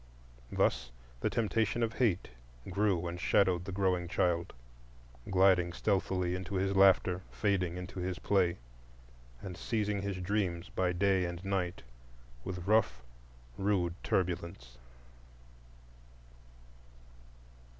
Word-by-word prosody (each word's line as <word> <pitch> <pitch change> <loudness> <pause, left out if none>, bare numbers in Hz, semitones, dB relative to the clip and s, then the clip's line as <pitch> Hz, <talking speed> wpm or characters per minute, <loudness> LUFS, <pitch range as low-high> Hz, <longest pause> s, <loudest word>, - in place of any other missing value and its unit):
Thus 60 - +1 0.3
the - - 0
temptation 115 0 0
of 110 -1 -1
Hate 105 -8 +1 0.4
grew 95 -3 +1
and 85 +1 -5
shadowed 90 -3 +2
the 100 - -5
growing 90 -2 0
child,—gliding 85 +3 0
stealthily 95 -2 0
into 95 +2 -4
his 95 +1 0
laughter, 95 -2 +4
fading 90 -4 0
into 90 +1 -7
his 90 0 -3
play, 95 -4 +1 0.9
and 90 -2 -6
seizing 105 0 -1
his 100 -1 -3
dreams 90 -2 -1
by 90 -1 0
day 95 0 +2
and 85 +2 -6
night 95 -4 -2 0.6
with 90 +1 -5
rough, 100 - +2 0.6
rude 95 -4 +1
turbulence. 85 -9 -2
90 Hz, 105 wpm, -32 LUFS, 85-100 Hz, 0.9 s, laughter